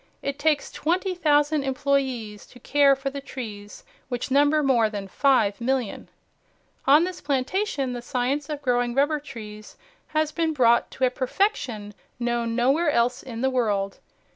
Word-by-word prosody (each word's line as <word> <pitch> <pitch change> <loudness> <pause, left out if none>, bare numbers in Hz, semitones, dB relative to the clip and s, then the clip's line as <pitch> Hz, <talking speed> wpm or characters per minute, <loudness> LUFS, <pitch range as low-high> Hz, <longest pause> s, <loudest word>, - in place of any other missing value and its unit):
It 280 +1 -3
takes 300 -1 +1
twenty 365 +4 -1
thousand 300 -3 +2
employees 265 -6 -1
to 245 - -16
care 280 +2 +4
for 270 0 -4
the 280 0 -6
trees, 210 -7 -8 0.3
which 245 +1 -4
number 290 +2 +4
more 240 -5 +3
than 200 -2 -6
5,000,000. 245 0 +1 0.8
On 295 +4 +7
this 365 0 -4
plantation 280 - -1
the 245 - -5
science 260 +4 -2
of 295 -1 -5
growing 245 -2 +1
rubber 290 +2 +2
trees 215 -6 -10 0.3
has 310 0 0
been 325 0 0
brought 235 -4 +3
to 260 - 0
a 250 - +1
perfection 250 - -1 0.3
known 235 -1 -1
nowhere 275 +7 +2
else 245 -3 +1
in 235 -3 -7
the 265 0 +1
world. 205 -6 -1
265 Hz, 150 wpm, -25 LUFS, 235-290 Hz, 0.8 s, On